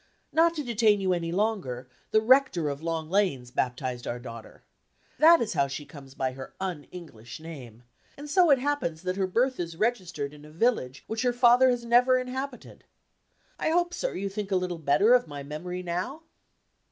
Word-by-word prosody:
Not 335 +1 +4
to 300 - -3
detain 225 -4 +3
you 190 -1 +1
any 170 -1 -2
longer, 185 - -2 0.2
the 215 - +3
rector 225 - +3
of 140 +1 -5
Long 165 -1 -3
Lanes 160 -10 0
baptized 125 -1 -2
our 120 - -3
daughter. 115 -2 -11 0.6
That 330 +2 +7
is 215 - -1
how 140 -3 +2
she 140 +2 -6
comes 135 -3 -13
by 130 -1 -1
her 130 +1 -10
un 180 -6 -4
English 120 -11 -10
name; 130 -8 -10 0.3
and 290 +1 -8
so 350 +3 +4
it 280 - +6
happens 255 - -2
that 185 0 -2
her 190 -1 0
birth 250 +7 +1
is 170 -2 -4
registered 175 -11 -2
in 150 0 -14
a 150 - -13
village 155 - 0
which 220 +1 -3
her 250 -1 +1
father 245 +1 +5
has 245 -1 -1
never 250 +2 +5
inhabited. 255 +1 -6 0.8
I - - 0
hope, 350 +2 +1
sir, - - -3
you 200 - -2
think 200 0 -5
a 195 - +1
little 180 -2 -2
better 160 - +4
of 250 -5 +4
my 145 -2 -7
memory 175 +5 -6
now?" 185 - -4
185 Hz, 190 wpm, -27 LUFS, 145-245 Hz, 0.8 s, That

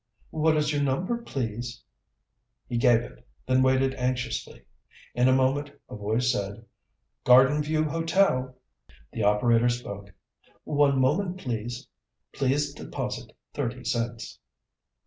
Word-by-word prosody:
"What 155 0 +2
is 150 0 +1
your 145 - 0
number, 175 - 0
please?" 120 - -5 0.8
He 120 - -2
gave 120 -1 +5
it, - - -12 0.2
then 130 0 +3
waited 130 0 +3
anxiously. 125 -2 -3 0.5
In 125 +1 +3
a - - +5
moment 140 +2 +1 0.2
a - - -5
voice 110 +4 0
said, 100 +3 -4 0.6
"Garden 130 +4 +6
View 155 +1 0
Hotel." 160 -5 +1 0.6
The 115 - -3
operator 115 +3 +3
spoke. 100 -5 -5 0.5
"One 145 -2 +2
moment, 175 +8 +1
please. 120 - -5 0.4
Please 140 +2 0
deposit - - -5 0.2
thirty 125 -3 -3
cents." 115 -2 -3
130 Hz, 120 wpm, -26 LUFS, 120-145 Hz, 0.8 s, Garden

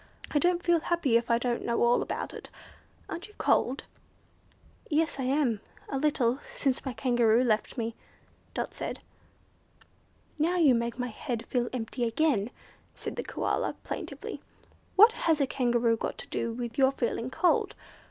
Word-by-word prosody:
I 295 - +3
don't 350 +2 +2
feel 345 -1 +4
happy 325 -7 +1
if 235 0 +2
I 235 - +4
don't 240 0 -1
know 235 0 +1
all 240 +1 +4
about - - -4
it. - - -9 0.6
Aren't 345 - -6
you 420 - -19
cold?" 260 +3 +2 1.1
"Yes, 315 -2 +1
I 260 - -1
am, 255 -6 +1 0.3
a 270 - -1
little, 265 -4 +2 0.2
since 270 -3 0
my 265 - -3
Kangaroo 240 -1 +3
left 220 +1 0
me," 230 -1 -2 0.6
Dot - - -2
said. - - -5 1.4
"Now 335 +4 +2
you 305 -7 +6
make 235 0 -1
my 250 0 -2
head 235 0 -4
feel 245 -1 0
empty 240 0 -3
again," 235 -2 +2 0.5
said - - -5
the - - -2
Koala, - - -1
plaintively. - - -6 0.5
"What 435 +4 +9
has 325 -9 +1
a 280 - +3
Kangaroo 240 -3 +2
got - - -3
to - - -9
do 230 - -1
with 235 +1 -5
your 265 0 +5
feeling 235 -1 -2
cold? 335 +7 +2
250 Hz, 160 wpm, -29 LUFS, 235-300 Hz, 1.4 s, What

